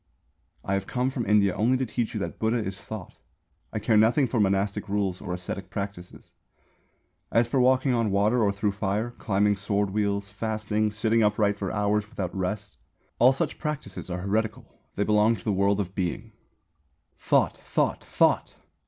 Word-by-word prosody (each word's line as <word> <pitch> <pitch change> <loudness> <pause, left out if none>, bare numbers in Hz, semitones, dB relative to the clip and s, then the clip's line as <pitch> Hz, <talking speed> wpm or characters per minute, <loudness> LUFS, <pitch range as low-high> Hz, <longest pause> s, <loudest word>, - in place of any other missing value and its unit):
"I 100 - -1
have 100 0 -1
come 125 +1 0
from 125 -5 -3
India 100 -2 +4
only 125 +4 +2
to 130 - -1
teach 115 0 -3
you - - -1
that - - -5
Buddha 110 +2 +1
is 95 -4 -4
Thought. 110 -5 -8 0.5
I - - -3
care 110 +1 +2
nothing 120 +6 +4
for 115 0 -1
monastic 100 0 0
rules 100 -3 -1
or - - -5
ascetic 90 +1 -5
practices. 100 -3 -7 1.0
As 115 0 +3
for 130 +3 +1
walking 130 +1 +3
on 115 -3 +1
water 105 +5 +2
or 100 -2 +3
through 100 +1 -1
fire, 105 +3 -2
climbing 105 0 +2
sword 100 0 0
wheels, 100 -1 0
fasting, 110 0 -1
sitting 110 +2 +1
upright 105 -1 +2
for 95 -2 -2
hours 105 0 0
without 100 -6 -4
rest 100 +2 -3 0.4
all 125 +2 +7
such 135 - -2
practices 150 - -5
are 90 0 -3
heretical; 110 +4 -2 0.2
they 100 - +1
belong 105 +2 +3
to 95 - -12
the 105 - 0
World 100 +1 +2
of 95 -2 -3
Being. 95 +5 -3 0.9
"Thought, - - +2
Thought, - - -1
Thought! - - +2
105 Hz, 175 wpm, -26 LUFS, 100-110 Hz, 1.0 s, all